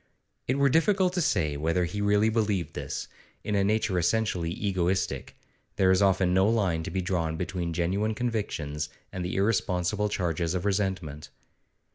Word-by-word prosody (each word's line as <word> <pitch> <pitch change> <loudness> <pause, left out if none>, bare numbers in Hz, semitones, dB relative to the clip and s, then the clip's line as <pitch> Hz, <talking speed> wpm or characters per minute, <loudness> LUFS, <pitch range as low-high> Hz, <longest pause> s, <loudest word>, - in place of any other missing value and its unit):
It 130 - +1
were 140 0 +4
difficult 180 +5 +3
to 180 - 0
say 80 - +1
whether 85 +4 +1
he 105 +4 -4
really 105 +1 +3
believed 105 -5 0
this; - - -5 0.4
in 105 - -2
a 100 -1 +3
nature 105 -2 +1
essentially 90 -2 0
egoistic, 95 -5 -1 0.4
there 95 -1 +4
is 95 +1 +3
often 95 -2 +3
no 95 +3 +4
line 95 -8 +1
to - - -5
be 95 +2 -1
drawn 85 -3 -1
between 90 -1 -3
genuine 95 +6 0
convictions 80 -11 -2 0.2
and 95 - -3
the 90 - -3
irresponsible 100 0 +1
charges 85 -3 -1
of 90 - -2
resentment. 95 -7 -2
95 Hz, 160 wpm, -27 LUFS, 85-105 Hz, 0.4 s, were